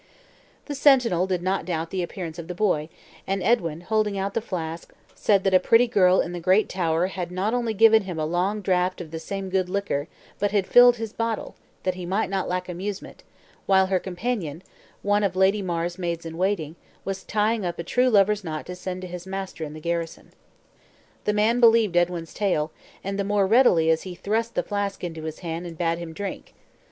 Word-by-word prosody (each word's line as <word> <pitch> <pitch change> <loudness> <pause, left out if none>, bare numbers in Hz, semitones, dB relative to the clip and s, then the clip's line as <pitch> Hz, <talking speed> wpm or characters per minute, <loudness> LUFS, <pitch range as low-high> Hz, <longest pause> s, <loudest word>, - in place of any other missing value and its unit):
The 295 - -5
sentinel 250 - +4
did 180 -2 -1
not 190 +1 0
doubt 165 -2 -3
the 190 - -1
appearance 175 -1 -6
of 165 - -7
the 180 - -5
boy, 170 -6 0 0.4
and 195 -1 -1
Edwin, 170 -7 +1
holding 210 +1 0
out 195 +1 -2
the 230 - 0
flask, 165 -6 -5 0.2
said 200 -3 +2
that 195 - +1
a 185 - +7
pretty 230 +6 +5
girl 190 -6 +4
in 170 - -4
the 175 - -5
great 185 +5 +3
tower 170 -2 0
had 185 -2 -4
not 190 +5 -1
only 235 -3 -1
given 220 0 +6
him 180 -3 -5
a 155 - -1
long 180 +6 0
draught 185 -1 +1
of 165 -3 -8
the 160 - -5
same 195 +3 -5
good 185 -1 +1
liquor 185 -7 -2 0.3
but 205 - +1
had 200 -1 +1
filled 245 +2 +7
his 225 -2 -6
bottle, 230 -1 -3 0.3
that 185 - 0
he 180 -1 -7
might 195 +2 0
not 190 -1 -1
lack 180 0 -2
amusement, 190 +3 -6 0.5
while 190 -1 +5
her 185 - +3
companion; 180 -4 -4 0.4
one 205 +1 +2
of 190 -2 0
Lady 190 +2 +3
Mar's 175 -1 -3
maids 170 -2 -3
in 165 0 -6
waiting, 175 -4 -1 0.3
was 195 0 -4
tying 215 +1 0
up 175 -1 -3
a 170 - -4
true 250 +8 +2
lover's 210 -1 +3
knot 155 -3 -5
to 180 - -7
send 185 0 -6
to - - -5
his 180 +1 -8
master 190 -3 -5
in 150 -1 -6
the 155 - -8
garrison. 170 +1 -4 0.9
The 210 - +2
man 220 +3 +2
believed 225 -5 +5
Edwin's 175 -1 0
tale, 175 -7 0 0.3
and 195 +1 -3
the - - +1
more 200 0 +2
readily 190 -7 +5
as 160 0 +1
he 185 -2 -7
thrust 220 +5 -2
the - - +1
flask 205 -2 -3
into 165 -2 -5
his 160 -1 -6
hand, 170 0 -4
and 165 -2 -9
bade 170 0 0
him 170 -1 -6
drink. 195 +4 -7
185 Hz, 210 wpm, -24 LUFS, 170-205 Hz, 0.9 s, a